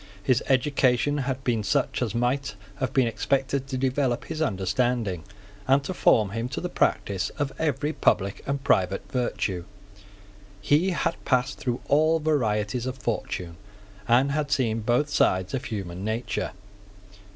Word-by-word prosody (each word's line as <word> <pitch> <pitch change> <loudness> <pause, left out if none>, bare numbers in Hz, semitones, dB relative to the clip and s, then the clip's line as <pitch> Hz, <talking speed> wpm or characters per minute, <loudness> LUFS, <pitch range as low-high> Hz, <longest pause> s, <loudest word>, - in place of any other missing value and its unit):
His 125 +1 +3
education 135 +1 +2
had 130 0 -3
been 120 -4 +1
such 100 +4 0
as 115 -4 -1
might 125 0 0 0.2
have 130 +5 -1
been 135 -2 +3
expected 130 +4 0
to 135 -1 -3
develope 130 -1 0
his 160 -1 -5
understanding, 105 - 0 0.4
and 135 +1 +4
to 185 - -3
form 105 - +3
him 115 +3 -3
to 140 - -4
the 180 - -3
practice 100 -2 +1
of 145 -2 -2
every 150 -1 0
public 100 -8 +1
and 140 0 -2
private 95 -8 +2
virtue. 105 -7 -1 1.0
He 145 - +3
had 175 -6 -1
passed 130 +1 +1
through 125 -1 -2
all 155 +3 +4
varieties 120 -7 0
of 130 0 -4
fortune, 90 -8 -3 0.5
and 130 +4 +4
had 150 0 -1
seen 120 -5 +1
both 120 +6 +1
sides 95 -3 +2
of 135 0 -2
human 95 -5 -5
nature. 110 +1 -2
125 Hz, 150 wpm, -26 LUFS, 105-140 Hz, 1.0 s, and